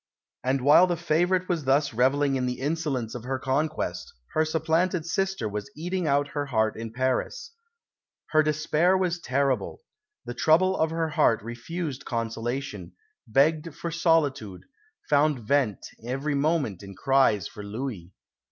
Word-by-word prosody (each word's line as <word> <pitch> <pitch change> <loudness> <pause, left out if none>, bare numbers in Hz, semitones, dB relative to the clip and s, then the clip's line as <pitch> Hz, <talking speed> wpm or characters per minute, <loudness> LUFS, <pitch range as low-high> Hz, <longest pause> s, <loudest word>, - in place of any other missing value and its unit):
And 130 +1 +1
while 150 +7 +6
the 175 -1 -1
favourite 175 +3 +1
was 170 -6 -1
thus 140 0 +2
revelling 135 +4 +2
in 130 -1 0
the 125 0 -3
insolence 140 -5 -2
of 125 - -6
her 135 +1 -1
conquest, 145 +4 -2 0.2
her 155 - +3
supplanted 160 +2 0
sister 190 - -1
was 105 0 -5
eating 175 +1 -2
out 145 0 +2
her 145 -1 -3
heart 110 -4 +1
in 115 0 -6
Paris. 130 - -2 0.8
"Her 155 - +5
despair 155 +4 +2
was 180 -2 0
terrible; 140 - -1 0.4
the 120 - -5
trouble 170 +8 +3
of 160 -2 +1
her 165 0 -1
heart 115 -7 +2
refused 130 +5 -5
consolation, 115 -4 -4 0.3
begged 150 +6 +2
for 170 - -5
solitude, 150 - +1 0.4
found 145 -2 +2
vent 135 -7 +1 0.2
every 135 +5 -2
moment 140 - 0
in 100 -1 -10
cries 130 -3 +2
for 105 - -10
Louis. 100 -4 -6
140 Hz, 145 wpm, -26 LUFS, 125-160 Hz, 0.8 s, while